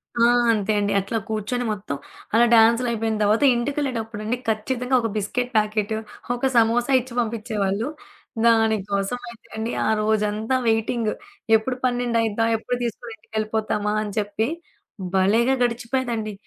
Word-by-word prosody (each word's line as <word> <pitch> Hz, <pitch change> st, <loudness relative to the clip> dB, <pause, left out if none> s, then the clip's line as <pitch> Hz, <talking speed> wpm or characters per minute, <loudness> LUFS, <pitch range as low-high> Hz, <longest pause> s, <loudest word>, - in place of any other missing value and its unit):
ఆ! 235 Hz, -, +4 dB, 0.3 s
అంతే 215 Hz, -2 st, 0 dB
అండి. 205 Hz, 0 st, 0 dB
అట్లా 200 Hz, +4 st, -2 dB
కూర్చొని 220 Hz, +3 st, -2 dB
మొత్తం 200 Hz, -8 st, -4 dB, 0.4 s
అలా 235 Hz, +2 st, +6 dB
డాన్సులైపోయిన 230 Hz, -1 st, +3 dB
తర్వాత 210 Hz, +5 st, +3 dB
ఇంటికెళ్ళేటప్పుడండి, 240 Hz, -4 st, -2 dB
ఖచ్చితంగా 250 Hz, +4 st, 0 dB
ఒక 230 Hz, -, 0 dB
బిస్కెట్ 245 Hz, +5 st, -2 dB
ప్యాకెటు, 215 Hz, 0 st, 0 dB, 0.4 s
ఒక 265 Hz, +2 st, 0 dB
సమోసా 235 Hz, +3 st, +3 dB
ఇచ్చి 250 Hz, 0 st, -12 dB
పంపిచ్చేవాళ్ళు. 220 Hz, -1 st, -1 dB, 0.6 s
దాని 225 Hz, -1 st, +4 dB
కోసమయితే 235 Hz, +4 st, -3 dB
అండి, 225 Hz, +2 st, -2 dB, 0.2 s
ఆ -, -, +2 dB
రోజంతా 215 Hz, +3 st, 0 dB
వెయిటింగ్. 225 Hz, 0 st, +1 dB, 0.4 s
ఎప్పుడు 235 Hz, +4 st, 0 dB
పన్నెండయిద్దా, 230 Hz, -3 st, +1 dB
ఎప్పుడు 245 Hz, +2 st, -3 dB
తీసుకొని 235 Hz, 0 st, -5 dB
ఇంటికెళ్ళిపోతామా 215 Hz, -1 st, -2 dB
అని 205 Hz, -, -5 dB
చెప్పి, 210 Hz, +2 st, -1 dB, 0.7 s
భలేగా 225 Hz, +7 st, +3 dB
గడిచిపోయేదండి. 235 Hz, -2 st, -1 dB
225 Hz, 120 wpm, -23 LUFS, 215-240 Hz, 0.7 s, అలా